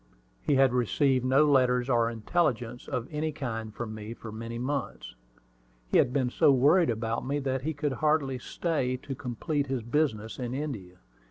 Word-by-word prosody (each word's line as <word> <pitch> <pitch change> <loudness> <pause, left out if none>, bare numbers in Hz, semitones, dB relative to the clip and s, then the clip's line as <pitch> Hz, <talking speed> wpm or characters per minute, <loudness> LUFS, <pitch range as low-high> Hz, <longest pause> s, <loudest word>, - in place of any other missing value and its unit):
He 145 - +1
had 135 -2 +4
received 130 +2 +2
no 135 +4 +4
letters 125 -3 +3
or 115 -3 +3
intelligence 120 0 -1
of 125 -1 -3
any 155 +1 -1
kind 115 -7 -4
from 110 0 -6
me 110 +1 -7
for 115 - -9
many 115 +2 -6
months. 130 - -3 0.8
He - - +4
had 125 - +3
been 130 -2 0
so 140 - +5
worried 145 +6 +4
about 115 0 -1
me 140 +3 -1
that 135 -2 -1
he 155 +3 -3
could 145 -1 -1
hardly 150 -3 +1
stay 130 -3 -1
to 135 +2 -6
complete 140 +4 -2
his 130 -3 -2
business 115 -4 -1
in 125 0 -3
India. 110 -12 -5
130 Hz, 175 wpm, -28 LUFS, 115-145 Hz, 0.8 s, so